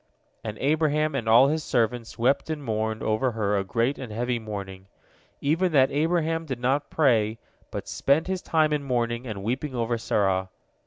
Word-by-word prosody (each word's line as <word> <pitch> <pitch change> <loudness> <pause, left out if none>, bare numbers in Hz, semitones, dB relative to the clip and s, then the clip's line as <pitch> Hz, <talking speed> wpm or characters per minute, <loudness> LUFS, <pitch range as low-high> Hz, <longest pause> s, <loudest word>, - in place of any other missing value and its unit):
And 105 -1 -5
Abraham 150 +1 +1
and 120 -5 -2
all 120 +5 +7
his 155 +1 -1
servants 115 -2 -1
wept 130 +6 +1
and 155 -2 -3
mourned 110 -2 -2
over 115 +3 +1
her 105 -2 0
a 100 - +1
great 115 +7 0
and 125 -4 -7
heavy 120 +2 -1
mourning, 100 -3 -7 0.5
even 165 +6 +1
that 135 -1 +5
Abraham 165 +2 +1
did 130 -4 -4
not 135 +4 0
pray, 115 -7 +2 0.3
but - - -6
spent 140 +4 +1
his 185 -1 -2
time 155 -2 +2
in 150 - 0
mourning 120 -2 -1
and 100 -4 -5
weeping 130 +5 -2
over 120 0 -1
Sarah. 95 -3 0
125 Hz, 175 wpm, -26 LUFS, 110-150 Hz, 0.5 s, all